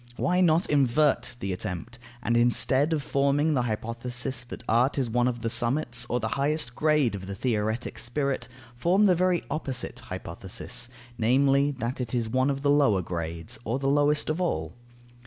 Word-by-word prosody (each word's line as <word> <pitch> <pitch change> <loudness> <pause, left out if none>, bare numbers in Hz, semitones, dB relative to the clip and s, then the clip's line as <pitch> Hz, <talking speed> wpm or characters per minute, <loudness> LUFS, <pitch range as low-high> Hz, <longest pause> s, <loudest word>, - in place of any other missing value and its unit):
Why 180 +1 +2
not 170 -1 +3
invert 140 -1 +2
the 95 -1 -2
attempt, 100 +5 -5 0.2
and 120 - +1
instead 130 +5 +3
of 155 -3 0
forming 140 +3 +2
the 130 - +2
hypothesis 120 +2 -3
that 120 - -9
art 120 +6 +2
is 125 -4 0
one 120 +1 +2
of 120 -2 -3
the 115 - 0
summits 120 -1 0
or 125 - 0
the 110 - -2
highest 140 -4 0
grade 150 -6 +2
of 95 -2 -6
the 100 - -5
theoretic 110 +1 -2
spirit, 140 +3 -2 0.3
form 180 +11 +3
the 190 - +5
very 180 0 +1
opposite 135 -5 -3
hypothesis, - - -6 0.3
namely, 135 +4 +3
that 125 +1 -3
it 125 0 -3
is 115 -2 0
one 130 +3 +2
of 140 -1 -2
the 140 0 +3
lower 135 -11 +3
grades, 85 +2 -5
or 115 +3 -1
the 135 0 0
lowest 145 +1 +3
of 160 +4 -2
all? 80 - -1
125 Hz, 175 wpm, -27 LUFS, 115-145 Hz, 0.3 s, the